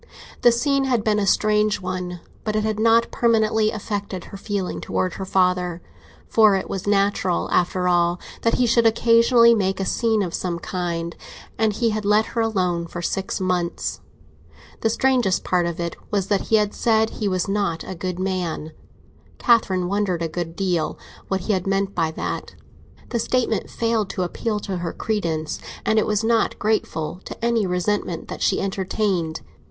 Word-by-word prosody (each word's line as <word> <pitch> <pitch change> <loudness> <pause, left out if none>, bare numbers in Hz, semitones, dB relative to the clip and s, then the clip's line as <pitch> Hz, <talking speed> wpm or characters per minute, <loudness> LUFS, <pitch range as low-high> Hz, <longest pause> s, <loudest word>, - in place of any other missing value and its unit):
The 240 - +7
scene 275 +3 +1
had 245 -5 +1
been 210 -1 +2
a 200 - 0
strange 210 +1 +2
one, 180 -1 -4 0.2
but 215 -1 -2
it 215 - +1
had 215 -1 -1
not 230 +1 +4
permanently 220 -2 +2
affected 205 -4 -4
her - - -11
feeling 200 -2 -3
towards 185 -2 -2
her 190 - -4
father, 180 -2 +1 0.5
for 215 -3 +5
it 190 - -2
was 195 0 -5
natural, 200 -3 +1
after 180 +1 +1
all, 175 0 +2 0.2
that 230 - +2
he 250 - +2
should 235 0 +4
occasionally 230 +1 +5
make 195 -3 0
a 195 - -1
scene 220 0 +1
of 175 -3 -4
some 175 -2 -2
kind, 170 -3 -3 0.4
and 220 -1 +1
he 230 +2 +1
had 215 0 -2
let 210 +2 +3
her 230 - +1
alone 180 -6 0
for 175 +1 -6
six 195 +2 -2
months. 180 -2 -1 0.8
The 225 - +1
strangest 245 -5 +2
part 175 -2 +1
of 170 -1 -4
it 170 -1 -3
was 195 -2 -1
that 200 -2 0
he 225 - +3
had 210 -1 +2
said 220 -1 +2
he 210 - -3
was 185 -1 0
not 195 -4 -1
a - - -6
good 180 0 -4
man; 180 -4 -2 0.7
Catherine 190 -7 +3
wondered 190 -3 0
a - - 0
great 165 0 -5
deal 180 -5 0 0.3
what 190 -1 -1
he 210 - 0
had 185 -1 -1
meant 195 0 0
by 165 -2 +1
that. 160 - -5 0.5
The 235 - -1
statement 230 -3 0
failed 225 -3 0
to 185 - -2
appeal 210 +4 -2
to 195 -3 -3
her 170 -1 -4
credence, 165 -8 -2 0.3
and 220 0 +3
it - - 0
was 210 0 +1
not 225 0 +2
grateful 180 -6 -1
to 235 - -5
any 230 -4 +2
resentment 180 -1 -1
that - - -6
she 190 - +2
entertained. 190 -4 -1
195 Hz, 180 wpm, -22 LUFS, 180-220 Hz, 0.8 s, The